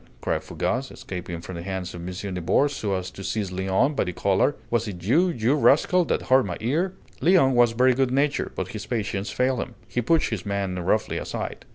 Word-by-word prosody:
cried - - -1
Fougas, 130 +2 -2
escaping 85 -2 -6
from 95 - -8
the - - -5
hands 95 0 -4
of 85 - -7
M. 85 - -6 0.3
Nibor 90 - +2
so 105 -8 -2
as 95 -1 -4
to 95 - -9
seize 100 -2 -2
Léon 95 +10 +1
by - - +2
the 90 - -3
collar, 100 +10 +1 0.2
"was 115 -1 +1
it 90 -4 -7
you, 160 - +4
you 120 -5 +1
rascal, 155 +5 +4
that - - -1
hurt 130 0 +4
my 90 - -4
ear?" 165 +11 0 0.3
Léon 170 -6 +5
was 120 -2 +4
very 130 +2 +4
good 130 0 +1
natured, 140 +3 0
but 95 -1 -3
his 105 0 -7
patience 105 -3 -2
failed 130 0 +1
him. - - -5
He 125 - -1
pushed 160 +7 +2
his - - -3
man 100 -3 -2
roughly 100 +5 0
aside. - - -5
110 Hz, 215 wpm, -25 LUFS, 95-135 Hz, 0.3 s, Léon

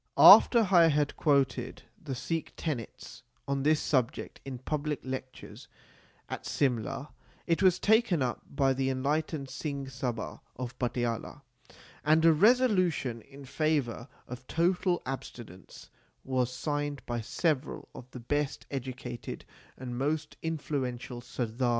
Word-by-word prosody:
After 230 -4 +9
I 170 -3 +7
had 150 -2 +1
quoted 135 -4 +1 0.2
the 140 -4 -4
Sikh 165 +5 -3
tenets 135 -9 -5 0.3
on 140 0 0
this 155 +2 +3
subject 130 -3 -1
in 135 -2 -6
public 150 +3 -2
lectures 130 0 -7 0.6
at - - -6
Simla, 135 +1 -1 0.3
it 165 -2 +1
was 185 -2 +5
taken 215 - +3
up 125 - -2
by 135 -1 +2
the 135 0 0
enlightened 140 +2 -1
Singh 140 -3 -4
Sabha 125 -3 -4 0.2
of 125 0 -6
Patiala; 120 +2 -2 0.6
and 155 +2 +4
a 165 - +7
resolution 185 - +3
in 140 +3 -13
favour 140 -4 -1 0.2
of 125 +1 -9
total 175 +1 +1
abstinence 120 -7 -8 0.3
was 130 -2 0
signed 145 0 -3
by 120 -1 -2
several 135 +4 -1
of 125 - -11
the 125 - -9
best 145 +4 -2
educated 130 -2 -6 0.3
and 125 -1 -5
most 150 +2 -1
influential 130 -6 -3
Sardars 120 +1 -7
of 115 - -16
the 130 - +2
State. - - +3
135 Hz, 135 wpm, -30 LUFS, 125-155 Hz, 0.6 s, After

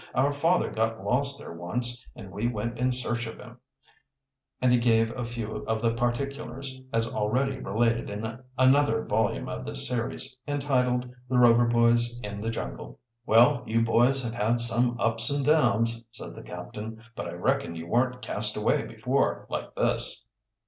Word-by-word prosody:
"Our 135 +3 +3
father 165 +5 +1
got 110 -2 -1
lost 140 +6 +2
there 140 - -8
once, 120 +8 -2
and 100 -6 -10
we 105 +5 -1
went 120 +1 -3
in 125 +1 +2
search 120 -1 -2
of 115 - -8
him," 120 0 -13 1.0
and 125 -1 +3
he 125 - +4
gave 115 -1 +2
a 125 - -3
few 115 -2 -5
of 110 0 0
the 115 0 +1
particulars, 130 +2 -3
as 115 0 +1
already 125 +5 -1
related 115 +2 0
in 110 +3 -5 0.2
another 130 - +4
volume - - 0
of 65 - -5
this 65 0 -3
series, 125 +2 -3
entitled 125 -4 0 0.2
"The 130 - +1
Rover 120 -1 +6
Boys 120 0 +3
in 105 0 -5
the 115 - -2
Jungle." 60 - -6 0.3
"Well, 125 +4 +5
you 115 +1 +2
boys 125 +4 +3
have 115 -1 -3
had 120 +1 +1
some 120 +1 +3
ups 115 +3 +3
and 140 -1 +1
downs," 115 -6 +2
said 115 - -8
the - - -9
captain. 110 +1 -8
"But - - -5
I - - -6
reckon 85 - -1
you 80 0 -6
weren't 125 +6 0
cast - - 0
away - - +1
before - - -1
like - - -4
this." 105 - -1
120 Hz, 170 wpm, -27 LUFS, 115-125 Hz, 1.0 s, Rover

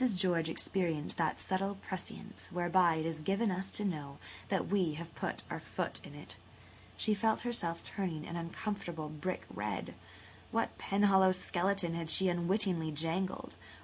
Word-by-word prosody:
George 175 -3 +2
experienced 165 -3 0
that 160 -2 +1
subtle 195 +1 0
prescience 195 +2 -5
whereby 175 -1 +4
it 160 0 -1
is 160 -1 -2
given 200 +6 +2
us 190 +1 +1
to 210 - 0
know 145 -7 -3 0.3
that 190 - +1
we 185 -5 +2
have 170 +1 -7
put - - -3
our - - -2
foot - - -2
in - - -10
it. - - -7 0.6
She 215 - +3
felt 220 +1 +2
herself 175 -9 -1
turning 175 -6 -3
an 170 - -5
uncomfortable 170 -2 -3
brick 155 +5 -3
red. - - -3 0.6
What 230 0 0
Penhallow 195 -2 +5
skeleton 185 -1 0
had 165 -1 -3
she 190 +3 +5
unwittingly 175 -1 +2
jangled? 165 +5 -1
180 Hz, 150 wpm, -34 LUFS, 165-195 Hz, 0.6 s, Penhallow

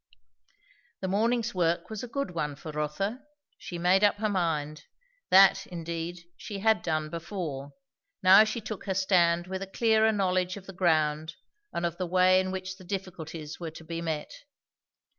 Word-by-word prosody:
The 190 - -2
morning's 230 +4 +1
work 175 +1 0
was 215 - -4
a 245 - -6
good 275 -3 -3
one 150 -4 -3
for 155 +2 -8
Rotha. 150 - -2 0.4
She 175 - -7
made 180 +3 +3
up 205 - +5
her 215 +1 -1
mind. 155 -6 -1 0.4
That, 195 +1 +6
indeed, 170 0 -5
she 205 - -6
had 220 +2 +3
done 155 -2 -2
before; 165 -5 -5 0.5
now 190 +3 +9
she 220 +2 -3
took 215 -1 -6
her 190 - -1
stand 175 -3 +3
with 190 +1 -5
a 195 - -4
clearer 220 +2 +3
knowledge 185 -2 0
of 195 - -11
the 195 - -9
ground 155 -3 +1 0.4
and 170 - -2
of 170 0 -2
the 180 - -1
way 185 +1 +5
in 185 0 -1
which 185 0 -5
the 190 - -13
difficulties 170 -5 -6
were 170 -2 -4
to 160 +1 -12
be 165 +1 -5
met. 160 -3 -3
180 Hz, 175 wpm, -28 LUFS, 165-195 Hz, 0.5 s, now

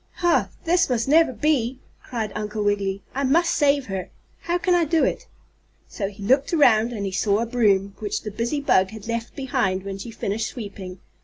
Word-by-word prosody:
"Ha! 345 -1 +2
This 350 -1 +2
must 240 -1 0
never 320 0 +5
be!" 255 0 0 0.2
cried 225 -4 -4
Uncle 210 0 -3
Wiggily. 200 -1 -1
"I 275 - -2
must 330 +6 +3
save 285 -2 +2
her. 190 -2 -5 0.3
How 345 +1 -1
can 360 0 +1
I 350 -1 +4
do 320 +1 +2
it?" - - -1 0.6
So 200 - -4
he 200 0 -10
looked 265 +7 +2
around, 235 -6 +4
and 210 -4 -4
he 195 - -3
saw 200 +2 +1
a 230 - 0
broom, 205 -5 +2
which 210 -1 -3
the 210 - -5
busy 235 +7 -2
bug 190 -9 +3
had 220 0 -10
left 230 0 -4
behind 245 -9 -1
when 195 0 -6
she 215 - -7
finished 220 -1 -3
sweeping. 200 -5 -8
225 Hz, 200 wpm, -23 LUFS, 200-275 Hz, 0.6 s, never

